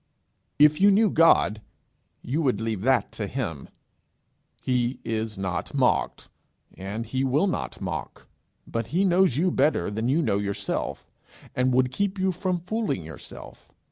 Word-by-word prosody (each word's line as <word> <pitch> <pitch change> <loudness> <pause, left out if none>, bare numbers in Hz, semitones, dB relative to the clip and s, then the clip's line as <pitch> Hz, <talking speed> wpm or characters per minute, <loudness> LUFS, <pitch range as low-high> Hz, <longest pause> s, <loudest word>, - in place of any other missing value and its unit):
If 150 +3 +5
you 200 - +7
knew 205 0 +4
God, 110 -10 +4 0.6
you 145 +7 -1
would 130 -9 +1
leave 110 -3 -2
that 125 -1 +2
to 105 - -4
him. 95 - -4 0.9
He 125 0 -1
is 110 -2 -3
not 95 -4 -3
mocked, - - +1 0.5
and 100 +5 -5
he 130 +4 -2
will 135 +7 +2
not 190 - -3
mock. 85 -8 -6 0.4
But 115 -1 -3
he 175 +9 +1
knows 180 -7 +3
you 180 +3 +2
better 135 - +1
than 110 +4 -2
you 160 +5 +2
know 105 -6 +1
yourself, 100 -1 -3 0.4
and 125 +1 +1
would 125 0 +3
keep 200 +7 -1
you 190 0 +1
from 180 0 -1
fooling 180 - -2
yourself. 80 -2 -11
130 Hz, 150 wpm, -25 LUFS, 105-170 Hz, 0.9 s, you